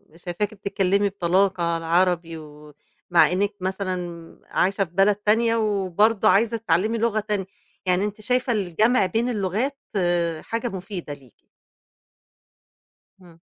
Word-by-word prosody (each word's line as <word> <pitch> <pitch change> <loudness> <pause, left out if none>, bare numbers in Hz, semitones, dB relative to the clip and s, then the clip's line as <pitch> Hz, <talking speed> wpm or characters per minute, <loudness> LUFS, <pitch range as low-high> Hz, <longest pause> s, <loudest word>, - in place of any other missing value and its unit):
شايفاكِ 175 +5 -4
بتتكلمي 200 0 0
بطلاقة 185 -2 +1
العربي، 170 0 +1
ومع 150 +3 -1
إنك 200 +3 0
مثلًا 180 -3 -4
عايشة 195 +2 +1
في 170 - -22
بلد 195 +2 +4
تانية 225 +3 +2
وبرضه 210 0 +2
عايزة 230 +3 +3
تتعلمي 215 +2 0
لغة 225 -1 +1
تانية، 210 -2 -2 0.4
يعني 185 +2 +2
أنتِ 210 +1 -6
شايفة 250 +2 0
الجمع 210 +3 +2
بين 225 +6 0
اللغات 220 +6 -1 0.6
حاجة 230 +3 -3
مفيدة 190 -6 -6
ليكِ؟ 135 -5 -17 1.8
امم. 170 -2 -18
195 Hz, 115 wpm, -23 LUFS, 175-215 Hz, 1.8 s, بلد